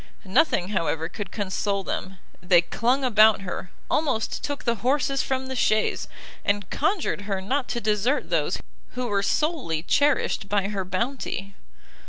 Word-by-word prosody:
Nothing, 190 - +2
however, 165 -4 -1
could 200 +4 -6
console 200 0 -1
them; 190 0 -4 0.2
they 180 -1 +5
clung 250 +9 +1
about 220 -4 +5
her, 180 -1 -5 0.2
almost 270 -8 0
took 285 -2 -3
the 235 -1 +1
horses 275 +2 +2
from 265 0 -2
the 260 0 -5
chaise, 215 -3 +1 0.4
and 205 -2 0
conjured 320 - 0
her 195 -1 0
not 255 +8 -1
to 240 - -2
desert 220 +6 0
those 165 +1 +1 0.3
who 250 0 -3
were 205 -4 +1
solely 255 - 0
cherished 285 -6 +2
by 200 -1 +1
her 200 -2 -2
bounty! 200 0 -3
210 Hz, 150 wpm, -25 LUFS, 190-260 Hz, 0.4 s, they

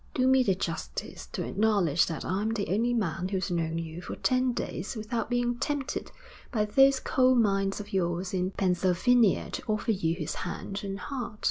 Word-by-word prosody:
'Do 255 - +2
me 260 0 +5
the 195 -7 +2
justice 165 -3 -5
to - - -4
acknowledge 195 -7 +2
that 165 - -4
I'm 200 +4 0
the 200 -3 -2
only 225 +6 +1
man 190 -6 -1
who's 190 -1 -2
known 165 -1 -1
you 165 +1 -5
for - - -6
ten 255 0 +2
days 205 -2 -4
without 225 +1 -3
being 245 0 0
tempted 290 0 -2 0.4
by 215 -4 +1
those 270 +5 +5
coal 255 -1 +3
mines 195 -4 +2
of 205 -1 -8
yours 180 0 -1
in 185 0 0
Pennsylvania 190 +4 +2
to - - -4
offer 215 +1 0
you 165 -5 0
his 160 -4 -4
hand 195 +3 -5
and 195 -1 -4
heart.' 245 -5 -5
200 Hz, 185 wpm, -28 LUFS, 180-240 Hz, 0.4 s, me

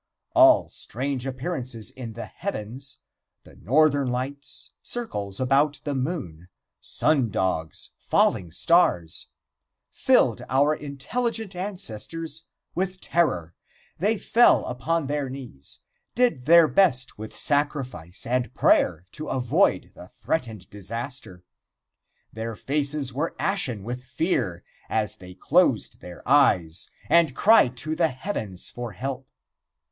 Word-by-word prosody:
All - - +6
strange 130 +1 -4
appearances 130 -5 -4
in 125 -4 -8
the 115 - -6
heavens 130 - -6 0.5
the - - -17
Northern 145 - +3
Lights, 135 +3 -4
circles 105 - -3
about 140 +3 +2
the 145 - -2
moon, 125 - -4 0.3
sun 140 -6 +2
dogs, 90 -5 -2
falling 85 -3 +1
stars 90 - +2 0.6
filled - - +3
our 145 +3 +3
intelligent 200 - -3
ancestors 165 - -4 0.3
with 185 +1 -2
terror. 90 - 0 0.5
They 210 +6 +2
fell 235 +4 +4
upon 155 +6 -1
their 145 -1 -2
knees 125 - -10 0.3
did 240 - +2
their 170 +1 +7
best 130 - +2
with 110 0 -8
sacrifice 135 - -1
and 125 +1 0
prayer 80 +3 +3
to 155 - -6
avoid 125 -2 +1
the 90 - -12
threatened 110 - -4
disaster. 110 -1 -6 0.9
Their 110 +1 -5
faces 140 0 -1
were 150 +6 -2
ashen 130 - -1
with 125 +3 -5
fear 130 - -1 0.3
as 110 -2 0
they 90 0 -12
closed - - +2
their 90 -1 -11
eyes 95 - +3 0.2
and 165 -6 +4
cried 140 - +5
to 155 0 -1
the 165 0 +3
heavens 125 - -4
for 120 -3 -6
help. 130 +5 -5
130 Hz, 115 wpm, -25 LUFS, 110-155 Hz, 0.9 s, their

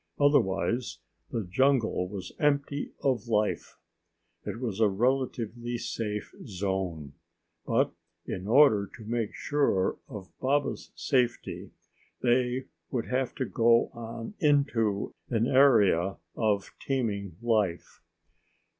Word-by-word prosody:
Otherwise 120 - +2 0.3
the 115 - -2
jungle 115 -1 +2
was 95 -4 -6
empty 140 -1 0
of 125 -5 +1
life. 105 -2 0 0.7
It - - -4
was 115 -5 -3
a 110 - +5
relatively 120 +1 -1
safe 105 -3 -4
zone. 95 -7 -3 0.5
But - - +2 0.3
in 95 +2 -5
order 115 -5 +5
to 110 - -11
make 115 -1 -2
sure 140 -10 +1
of 105 -8 -9
Baba's 140 +2 0
safety, 125 -4 -1 0.5
they 125 +1 +2 0.2
would 120 -4 -3
have 130 0 -1
to 130 - -1
go 115 0 +3
on 115 - -7
into 140 - +2 0.2
an 115 -2 +1
area 105 -9 +4 0.2
of 105 -3 0
teeming 105 - -2
life. 110 -7 -1
115 Hz, 110 wpm, -28 LUFS, 100-130 Hz, 0.7 s, a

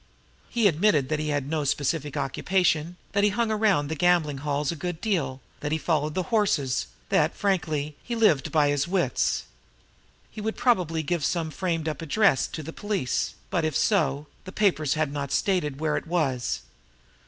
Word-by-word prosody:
He 235 -3 +3
admitted 160 -6 +2
that 155 - 0
he 155 0 -2
had 145 -2 -1
no 155 0 -1
"specific 145 +1 -1
occupation," 170 +3 0
that 200 - +1
he 210 - +5
hung 225 +2 0
around 210 -9 +2
the 160 - -3
gambling 160 -3 +2
hells 145 +1 -1
a - - -4
good 175 +1 -4
deal, 140 - -1 0.2
that 150 - -3
he 155 - +2
followed 155 -2 0
the 185 - 0
horses 165 - +1 0.2
that, - - +2
frankly, 155 -7 -1
he 240 - -3
lived 185 - +3
by 150 -3 +3
his 145 +1 +1
wits. 175 -8 +1 0.9
He 215 - -7
had 220 +1 -3
probably 180 -10 +2
given 170 +2 -1
some 160 +2 0
framed 165 -3 -2
up 155 -1 -3
address 165 - +3
to 155 - -6
the 165 - -7
police, 205 - -2 0.2
but, 170 - +1
if 155 -3 0
so, 150 -8 +1 0.2
the 185 - -8
papers 170 -9 +1
had 155 -2 0
not 140 -2 -3
stated 150 -8 0
where 155 -1 0
it - - -3
was. 130 - 0
160 Hz, 180 wpm, -26 LUFS, 145-190 Hz, 0.9 s, he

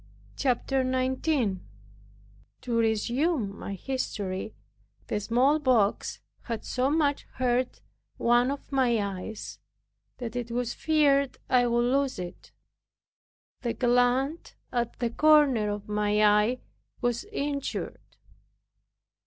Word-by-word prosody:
CHAPTER 265 0 +1
19 255 - 0 1.0
To 240 -2 -2
resume 230 - +1
my 200 - -6
history, 205 -5 -4 0.5
the 210 - -2
smallpox 250 -1 +2 0.2
had 230 -3 -4
so 255 +1 0
much 290 -2 +1
hurt 250 0 0 0.4
one 240 +2 +3
of 280 +1 -5
my 255 -4 +3
eyes, 200 +1 -5 0.6
that 240 -2 -6
it 245 -1 -3
was 240 0 -2
feared 280 -4 +2
I 245 -1 +4
would 240 0 +2
lose 270 +1 +1
it. 180 -1 -8 1.1
The 235 -2 -2
gland 245 +5 +1 0.2
at 235 -1 -2
the 235 -2 -1
corner 285 -7 +4
of 205 0 -4
my 210 0 +1
eye 210 +4 +3 0.4
was 240 - -1
injured. 290 -9 -4
245 Hz, 105 wpm, -27 LUFS, 220-270 Hz, 1.1 s, I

